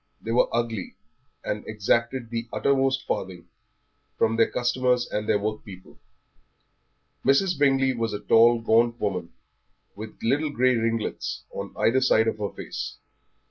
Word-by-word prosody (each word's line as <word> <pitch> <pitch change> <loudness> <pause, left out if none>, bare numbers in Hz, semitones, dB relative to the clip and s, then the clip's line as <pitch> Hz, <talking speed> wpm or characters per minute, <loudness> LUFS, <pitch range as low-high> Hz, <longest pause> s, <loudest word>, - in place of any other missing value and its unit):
They 115 - -5
were 120 - +3
ugly, 115 -4 -2 0.5
and 105 - -3
exacted 115 +3 -1
the 115 0 -3
uttermost 135 -1 +1
farthing 90 -2 -4 0.7
from 115 - +2
their 115 0 +3
customers 125 0 +1
and 105 0 -3
their 105 - +4
workpeople. 100 -3 -7 1.2
Mrs. 175 +7 +3
Bingley 135 -2 +3
was 115 -2 -2
a 105 - -4
tall, 115 +1 +4
gaunt 115 +1 +2
woman, 90 -4 -3 0.6
with 110 +1 -9
little 145 +7 +1
grey 130 -2 +2
ringlets 115 -1 -2
on - - -7
either 130 +3 +2
side 110 -3 +3
of 110 - -1
her 100 -1 -2
face. - - -7
115 Hz, 140 wpm, -25 LUFS, 110-130 Hz, 1.2 s, their